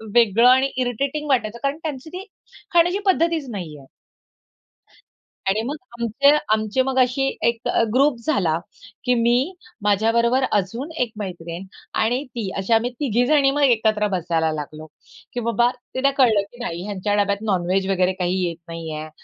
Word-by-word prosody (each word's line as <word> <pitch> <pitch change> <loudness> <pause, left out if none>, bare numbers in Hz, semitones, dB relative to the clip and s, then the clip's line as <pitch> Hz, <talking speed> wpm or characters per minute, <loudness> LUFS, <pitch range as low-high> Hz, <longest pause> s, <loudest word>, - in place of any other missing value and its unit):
वेगळं 230 +1 +5
आणि 260 +2 +4
इरिटेटिंग 270 +4 -1
वाटायचं 235 -4 0
कारण 275 +1 0
त्यांची 300 -2 -5
ती 365 +3 -7 0.5
खाण्याची 350 +3 +4
पद्धतीच 335 -6 +1
नाही 175 -9 -6
आहे. 140 - -14 1.6
आणि 205 +3 +1
मग 285 +4 -3 0.2
आमचे 235 +5 +3 0.2
आमचे 215 +3 +1
मग 265 0 -1
अशी 255 +2 +2 0.2
एक 235 0 -1
अ, - - +2
ग्रुप 275 +2 +4
झाला 180 - +2 0.5
की 250 - +2
मी, 245 +9 +2 0.3
माझ्याबरोबर 230 +5 +2
अजून 230 - -1
एक 240 -2 0
मैत्रीण 175 -3 -6 0.4
आणि 245 +5 +1
ती 220 -5 -3
अशी 195 +4 0
आम्ही 230 +2 +2
तिघी 245 -4 +1
जणी 280 -2 +4
मग 290 +1 -1
एकत्र 220 -5 +3
बसायला 170 -4 0
लागलो, 155 0 -6 0.5
की 245 - -2
बाबा, 235 +1 +2 0.3
तिला 275 +2 +2
कळलं 230 -6 +5
की 240 - -17
नाही 170 -5 -4
ह्यांच्या 205 0 -2
डब्यात 200 0 -1
नॉनवेज 185 +1 0
वगैरे 185 -1 +2
काही 180 +1 0
येत 170 -1 -3
नाही 165 -1 -6
आहे. 155 +1 -6
230 Hz, 160 wpm, -22 LUFS, 190-265 Hz, 1.6 s, वेगळं